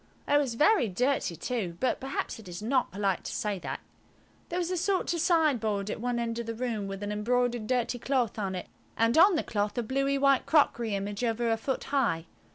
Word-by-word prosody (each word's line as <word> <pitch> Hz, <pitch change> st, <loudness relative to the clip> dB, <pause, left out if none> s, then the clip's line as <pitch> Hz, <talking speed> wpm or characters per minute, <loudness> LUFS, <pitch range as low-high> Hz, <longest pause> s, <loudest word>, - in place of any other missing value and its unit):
It 290 Hz, 0 st, +4 dB
was 265 Hz, -5 st, -1 dB
very 305 Hz, -, +4 dB
dirty 240 Hz, -1 st, 0 dB
too, 190 Hz, -4 st, -3 dB
but 255 Hz, -, +1 dB
perhaps 270 Hz, -2 st, -4 dB
it 215 Hz, -, -12 dB
is 175 Hz, 0 st, -6 dB
not 250 Hz, +4 st, +1 dB
polite 195 Hz, -1 st, -1 dB
to -, -, -4 dB
say 205 Hz, -3 st, -2 dB
that. -, -, -5 dB, 0.7 s
There 350 Hz, -, -2 dB
was 360 Hz, 0 st, -1 dB
a -, -, 0 dB
sort 365 Hz, +1 st, 0 dB
of 340 Hz, -, -2 dB
sideboard 240 Hz, -, +2 dB
at -, -, -5 dB
one 245 Hz, 0 st, -1 dB
end 235 Hz, 0 st, -2 dB
of 235 Hz, -, -5 dB
the 230 Hz, -, -3 dB
room, 225 Hz, -4 st, -2 dB
with 195 Hz, +1 st, -6 dB
an 205 Hz, -, -3 dB
embroidered 240 Hz, +1 st, 0 dB
dirty 245 Hz, 0 st, 0 dB
cloth 245 Hz, -5 st, 0 dB
on 195 Hz, -2 st, -2 dB
it, 180 Hz, -, -5 dB, 0.3 s
and 230 Hz, +1 st, +3 dB
on 370 Hz, +3 st, +7 dB
the 315 Hz, -, 0 dB
cloth 205 Hz, +1 st, -2 dB
a 240 Hz, -, +1 dB
bluey 275 Hz, +4 st, 0 dB
white 275 Hz, -1 st, +3 dB
crockery 235 Hz, -8 st, +3 dB
image 200 Hz, +3 st, -3 dB
over 230 Hz, 0 st, +1 dB
a -, -, +3 dB
foot 255 Hz, +4 st, -3 dB
high. 230 Hz, -13 st, 0 dB
235 Hz, 220 wpm, -29 LUFS, 210-275 Hz, 0.7 s, on